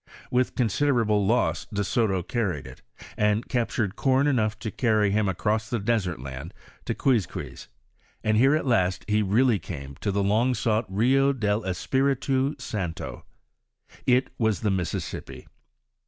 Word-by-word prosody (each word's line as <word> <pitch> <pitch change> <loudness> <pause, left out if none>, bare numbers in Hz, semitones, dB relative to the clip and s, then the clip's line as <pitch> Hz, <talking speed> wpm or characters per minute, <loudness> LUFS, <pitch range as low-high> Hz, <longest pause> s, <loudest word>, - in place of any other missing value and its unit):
With 125 0 +1
considerable 115 -4 +2
loss 120 +4 +1
De*Soto 100 -1 0
carried 90 - -2
it, 65 0 -12 0.4
and 105 +2 +1
captured 115 -5 -1
corn 135 +3 +2
enough 110 -7 +1
to 110 0 -5
cany 110 -4 +2
him 105 -1 +1
across 110 +4 -1
the 120 - 0
desert 100 - -1
land 70 +7 -8 0.3
to - - -2
Qnizquiz, 120 -8 -1 0.6
and 110 0 +2
here 135 +6 +5
at 155 - -1
last 95 -8 +1
he 105 0 +2
really 110 +2 +3
came 70 -5 -7
to 100 - -2
the 100 +1 0
long 115 +6 +2
sought 110 -1 0
Kio 135 +8 +3
del 105 -3 0
Espiritu 135 +7 0
Santo. 100 - -5 0.8
It 125 +1 +3
was 110 -4 +1
the 105 - +1
Mississippi. 90 -3 -4
110 Hz, 140 wpm, -26 LUFS, 100-125 Hz, 0.8 s, here